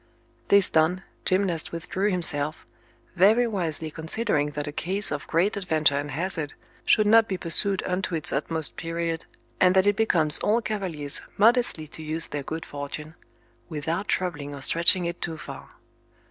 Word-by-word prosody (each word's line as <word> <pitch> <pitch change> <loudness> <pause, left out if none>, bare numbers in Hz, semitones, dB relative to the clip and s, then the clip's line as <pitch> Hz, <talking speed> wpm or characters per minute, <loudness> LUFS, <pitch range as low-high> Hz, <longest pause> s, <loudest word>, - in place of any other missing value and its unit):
This 200 -2 +5
done, 165 +4 +2 0.2
Gymnast 185 -4 0
withdrew 180 +4 -2
himself, 155 -5 -1 0.5
very 210 +7 +5
wisely 165 -8 -3
considering 160 -2 -1
that 145 - -2
a 145 - -5
case 190 +7 -2
of 145 - -4
great 175 +7 +1
adventure 160 -7 +1
and 145 +1 -2
hazard 155 0 -2 0.3
should 215 - +4
not 225 +1 +6
be 190 - -2
pursued 190 +3 +1
unto 180 -1 -2
its 155 - +2
utmost 155 +2 -1
period, 165 0 -3 0.3
and 185 0 +4
that 190 0 +4
it 205 0 +3
becomes 170 -8 +2
all 220 +3 +2
cavaliers 180 -11 -2 0.2
modestly 230 -6 +3
to 160 - -10
use 160 +1 -2
their 145 - -3
good 160 +4 -6
fortune, 145 +2 -7 0.6
without 165 +6 -3
troubling 150 -6 -2
or 140 - -9
stretching 170 +3 +4
it 170 0 -4
too 165 -2 -2
far. - - -9
170 Hz, 160 wpm, -25 LUFS, 155-195 Hz, 0.6 s, not